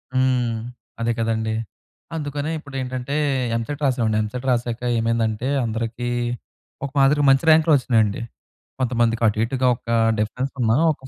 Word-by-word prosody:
హ్మ్, 125 -3 +2 0.4
అదే 115 - +1
కదండీ. 110 -1 -1 0.6
అందుకనే 145 +1 -3
ఇప్పుడు 140 -3 -12
ఏంటంటే 130 +2 -4 0.4
ఎంసెట్ 145 +6 -4
రాసామండి. 115 -5 +1
ఎంసెట్ 125 +5 -5
రాసాక 120 -1 -1 0.2
ఏమైందంటే! 115 +1 0 0.2
అందరికీ 115 +2 -3 0.8
ఒక 140 - -6
మాదిరిగా 140 +2 +4
మంచి 135 +4 +3
ర్యాంక్‌లు 160 0 +5
వచ్చినాయండి. 110 -5 +1 0.6
కొంతమందికి 120 -2 +1
అటు 105 0 0
ఇటుగా 130 +1 0
ఒక 115 - -13 0.3
డిఫరెన్స్ 125 +5 -2
ఉన్నా 115 -1 +3 0.2
ఒక 145 - -7
120 Hz, 130 wpm, -22 LUFS, 115-135 Hz, 0.8 s, ర్యాంక్‌లు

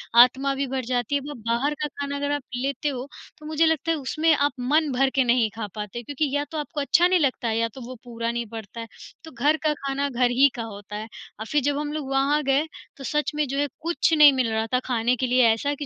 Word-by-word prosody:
आत्मा 260 +3 +6
भी 275 - -1
भर 260 -2 -3
जाती 245 +1 -1
है। 280 - +1
वो 295 - -6
बाहर 255 +6 +1
का 300 - 0
खाना 285 0 -5
अगर 285 0 -2
आप 290 -1 -1
लेते 275 +3 -2
हो, 260 -1 -5 0.3
तो 300 - -13
मुझे 315 +1 +2
लगता 320 0 +1
है 325 - 0
उसमें 310 +4 +1
आप 285 +1 +1
मन 295 +4 +1
भर 265 +1 +2
के 265 - +4
नहीं 240 -2 +2
खा 220 -2 -4
पाते, 210 +2 -5
क्योंकि 285 +3 -2
या 290 - +1
तो 315 - -4
आपको 295 0 -3
अच्छा 345 +5 +4
नहीं 365 -1 +3
लगता 260 -4 0
है 225 0 0
या 230 0 +1
तो 265 - -9
वो 255 - -7
पूरा 235 -1 -3
नहीं 235 0 -3
पड़ता 225 0 -8
है, 230 - -6 0.4
तो 320 - -11
घर 290 +6 +2
का 305 -1 +2
खाना 280 +1 -1
घर 245 -1 +1
ही 275 +3 +5
का 235 - -4
होता 205 -1 -9
है। 215 +1 -5 0.3
अब 220 - -5
फिर 295 -1 +3
जब 285 +1 +1
हम 295 0 -3
लोग 290 -3 -4
वहाँ 280 +3 +2
गए, 275 +3 +2 0.3
तो 270 - -10
सच 300 +3 -1
में, 300 -2 0
जो 275 +2 -3
है, 290 - +1
कुछ 335 0 0
नहीं 295 -2 +9
मिल 255 -3 0
रहा 220 0 0
था, 250 - +4
खाने 245 0 +1
के 255 +1 -1
लिए 250 -1 +4
ऐसा 285 +6 -2
कि 290 0 -6
270 Hz, 270 wpm, -24 LUFS, 240-295 Hz, 0.4 s, नहीं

